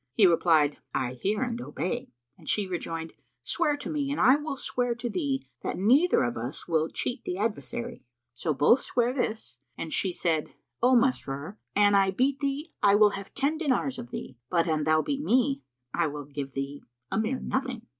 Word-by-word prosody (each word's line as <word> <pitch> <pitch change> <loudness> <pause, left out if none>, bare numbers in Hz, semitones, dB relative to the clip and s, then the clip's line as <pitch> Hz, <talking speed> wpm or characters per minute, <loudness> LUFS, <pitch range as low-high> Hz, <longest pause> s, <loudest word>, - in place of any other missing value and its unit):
He 205 - +6
replied, 160 -4 +4 0.2
"I 130 -1 0
hear 205 - -1
and 240 -1 -3
obey," 185 - -3 0.3
and - - -9
she 210 - +2
rejoined, 165 -3 -4 0.3
"Swear 300 -4 +1
to - - -6
me 290 -3 -1
and 285 - -2
I 260 - +7
will 295 -1 -3
swear 245 -2 -1
to 240 0 -4
thee 275 -1 -1
that - - -3
neither 260 - +4
of 120 -1 -1
us 120 +6 -5
will 160 -2 +1
cheat[FN#323] 245 -1 -3
the 180 - -2
adversary." 235 +3 -3 0.3
So 155 +6 -2
both 150 - +5
sware 245 0 0
this 220 - -3 0.2
and 160 - -4
she 190 - +1
said, 165 -3 0 0.3
"O 250 +2 +5
Masrur, 200 - 0 0.2
an 205 0 +5
I 195 -1 +5
beat 260 +8 +1
thee, 285 +3 -2
I 200 0 +6
will 210 0 +6
have 195 -1 -8
ten 290 +3 0
dinars 240 - 0
of 120 - -7
thee, 125 0 -7
but 170 -1 +2
an 155 -2 +1
thou 155 0 +3
beat 280 -1 -2
me, 270 +2 +2 0.3
I 170 -2 +2
will 145 -1 -6
give 140 -1 -6
thee 140 +1 -4 0.3
a - - +1
mere 225 +4 0
nothing." 255 -3 -3
210 Hz, 195 wpm, -28 LUFS, 160-260 Hz, 0.3 s, I